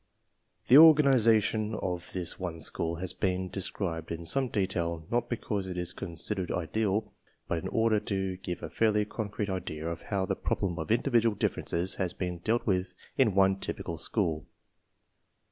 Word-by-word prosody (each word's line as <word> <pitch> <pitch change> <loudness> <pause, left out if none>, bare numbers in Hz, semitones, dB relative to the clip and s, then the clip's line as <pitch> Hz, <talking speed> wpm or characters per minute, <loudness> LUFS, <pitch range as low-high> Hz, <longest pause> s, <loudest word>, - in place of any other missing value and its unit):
J^ - - -28
The 130 - +9
organization 115 -8 +5
of 90 -4 -4
this 90 -3 -3
one 85 -3 -4
school 80 +1 0
has 90 +2 -3
been 95 -1 -1
de 95 +2 -4
scribed 85 -4 -2
in 85 0 -5
some 135 +9 +2
detail 85 -6 -2
not 120 0 0
because 105 -4 -3
it 90 -1 -5
is 90 -1 0
considered 90 +3 -3
ideal, 105 +4 -1 0.3
but 85 - -1
in - - -5
order 110 -1 +2
to 95 -2 -3
give 90 -1 -6
a - - -4
fairly 105 -2 +2
concrete 105 -1 -4
idea 80 -4 -4
of 85 0 -4
how 95 -2 -2
the - - -1
problem 90 -3 -2
of 80 - -5
individual 115 -2 +2
differences 90 -1 -1
has 90 -2 0
been 90 -2 -4
dealt 115 +7 0
with 90 -3 0 0.2
in 115 -8 +3
one 95 0 +4
typical 85 -4 -4
school. 80 -3 -1
95 Hz, 170 wpm, -29 LUFS, 85-110 Hz, 0.3 s, The